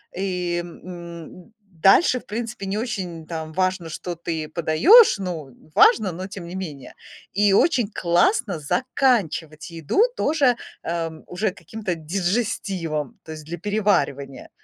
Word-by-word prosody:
и, 180 -2 -1
м, 170 +2 -10 0.2
дальше, 195 - +4
в - - -21
принципе, 220 -2 -5
не 195 +2 -2
очень 185 -8 -4
там 160 -1 -6
важно, 185 -1 0
что 175 +2 -5
ты 160 -2 -4
подаёшь. 170 - +6
Ну, 175 -7 -5 0.2
важно, 200 +3 +5
но 185 +3 -6
тем 195 -3 -8
не 175 - -8
менее. 155 -9 -7 0.4
И 205 0 +3
очень 240 - +3
классно 190 - +1
заканчивать 175 - 0
еду 165 - 0
тоже, 280 - +2 0.3
эм, 165 -1 -4
уже 195 +4 -1
каким-то 205 -1 -5
дижестивом, 180 0 -2
то 160 - -9
есть 155 -1 -8
для 170 +3 -6
переваривания. 160 -9 -1
180 Hz, 130 wpm, -23 LUFS, 165-210 Hz, 0.4 s, подаёшь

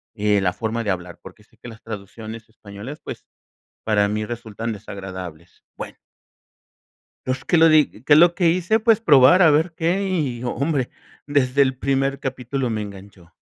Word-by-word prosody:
eh, 105 -2 +1
la 90 -1 +1
forma 115 0 -3
de 105 - -3
hablar, 90 -2 -6
porque - - -14
sé - - -30
que - - -11
las 115 -1 -12
traducciones 110 +1 -9
españolas, 110 +6 -10
pues, - - -8 0.6
para 105 -2 +2
mí 105 +1 -2
resultan 115 0 -6
desagradables. 95 -5 -9
Bueno - - -8 1.3
pues, 130 +1 -3
¿qué 175 - +2
lo 165 +1 +6
di 155 -2 +5 0.2
qué 145 - +4
es 155 - +7
lo 175 0 +5
que 175 -4 +3
hice? 185 +6 +1
Pues 225 -1 +3
probar 145 - +6
a 160 -3 +6
ver 160 +3 +1
qué 180 +5 0
y 140 -10 -2
hombre, 135 +2 -1 0.4
desde 140 -1 +1
el 130 -1 +2
primer 135 0 -1
capítulo 130 -1 -3
me 110 -1 -2
enganchó. 95 -4 -12
120 Hz, 175 wpm, -21 LUFS, 105-150 Hz, 1.3 s, es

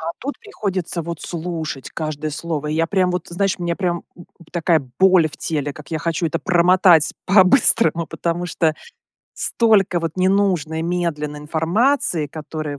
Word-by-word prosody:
А 160 +1 -3
тут 280 +2 -5
приходится, 190 - -4
вот, 170 0 -6
слушать, 160 -5 -5
каждое 155 -1 -4
слово. 150 -1 -4
И 155 - -2
я 165 +1 +1
прям, 185 0 +1
вот, 180 +1 -2
ты 170 - -11
знаешь, 195 0 0
мне 170 -1 -2
прям, 175 -2 -1 0.2
м, 175 - -13
м, 170 - -17
такая 170 -2 +2 0.2
боль 185 -3 +5
в - - -13
теле, 145 -3 -3
как 150 +2 -13
я 160 - -2
хочу 165 +1 -1
это 155 - -2
промотать 175 -3 +4
по-быстрому. 190 - +4
Потому 170 +3 -3
что, 160 -2 0 0.6
столько, 200 -6 +2
вот, 165 +1 -4
ненужной 185 -4 +1
медленной 165 -4 -2
информации, 165 - +1
которую, 155 -1 -6
170 Hz, 165 wpm, -20 LUFS, 155-185 Hz, 0.6 s, боль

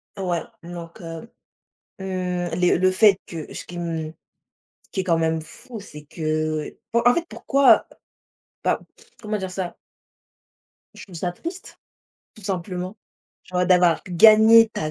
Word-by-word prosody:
Ouais, 180 -4 -1 0.2
donc 170 -1 -9
heu. 165 +6 -8 0.7
Mmh, 180 -2 -2
les 180 -1 +3
le 185 +1 +4
fait 195 0 +5
que 160 -3 -7
ce - - -7
qui 175 - -10
m 165 -2 -4 0.7
ce - - -30
qui - - -3
est - - -5
quand 170 -3 +3
même 160 0 0
fou, 235 +9 -10
c'est 150 -7 -11
que 155 0 -2 0.2
en 235 - +4
en - - +5
fait, 340 +4 -1
pourquoi, 275 0 +4 0.8
bah, - - +1 0.4
comment 215 -1 -2
dire 190 -2 -4
ça? 185 -1 -4 1.2
Je - - -11
trouve 185 - -13
ça 175 +2 -2
triste, 340 - -8 0.6
tout 215 - -15
simplement. 185 0 -4 0.5
Genre 180 0 -1
d'avoir 180 -2 +4
gagné 220 +5 +7
ta 155 -7 -3
180 Hz, 150 wpm, -23 LUFS, 165-205 Hz, 1.2 s, gagné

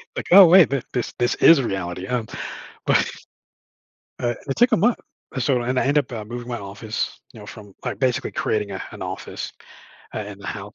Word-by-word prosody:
Like, - - -4
"Oh 195 0 +11
wait 180 -1 +7
th 135 -3 -1
this 125 -3 -2
this 120 - +2
is 165 -4 +7
reality, 95 -5 -3
huh?" 125 +1 -1 0.6
But, - - +3 1.1
uh, 120 0 +1
it 135 - -1
took 240 +2 +4
a 220 - +6
month, 235 +4 +2 0.4
so 125 -1 +1
and - - -5
I - - -4
end 130 0 +1
I - - +2
end 145 +2 +3
up 110 -2 -5
moving 120 +1 -7
my 120 - -3
office, 100 +2 -5
you 110 - -12
know, 105 - -11
from, 105 -2 -12
like, - - -3
basically 130 -2 0
creating 105 -2 -1
a 95 - -5
an - - -11
office, - - -6 0.6
uh, - - -2
in 105 -1 -8
the 100 - -10
house 105 +1 -6
120 Hz, 210 wpm, -22 LUFS, 105-135 Hz, 1.1 s, Oh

